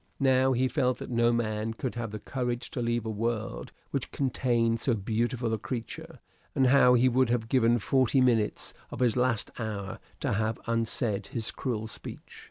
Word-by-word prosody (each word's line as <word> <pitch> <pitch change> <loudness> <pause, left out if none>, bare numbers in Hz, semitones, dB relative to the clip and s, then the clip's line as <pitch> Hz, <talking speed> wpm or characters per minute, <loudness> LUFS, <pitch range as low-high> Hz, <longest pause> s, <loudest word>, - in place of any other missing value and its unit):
Now 130 -1 +4
he 130 +1 +2
felt 125 -1 +1
that - - -7
no 120 0 +3
man 110 -1 -1
could 125 +1 -3
have 120 -2 -4
the 110 - -5
courage 125 +2 -3
to 135 -6 -3
leave 120 -1 0
a - - -2
world 115 +1 -3 0.2
which - - -2
contained 120 -4 +1
so 125 - +2
beautiful 115 +3 -1
a 110 - -1
creature; 115 +1 -6 0.4
and 135 - +3
now 125 -1 +6
he 125 +1 +4
would 130 0 +3
have 120 -2 0
given 120 -1 +3
forty 130 +3 +2
minutes 120 -5 +2 0.2
of - - -7
his 125 -3 +2
last 125 -3 +1
hour 105 -4 -4 0.2
to - - 0
have 110 +2 0
unsaid 115 -3 0
his 115 -5 -3
cruel 115 -5 -3
speech. 110 - -8
120 Hz, 180 wpm, -29 LUFS, 110-125 Hz, 0.4 s, now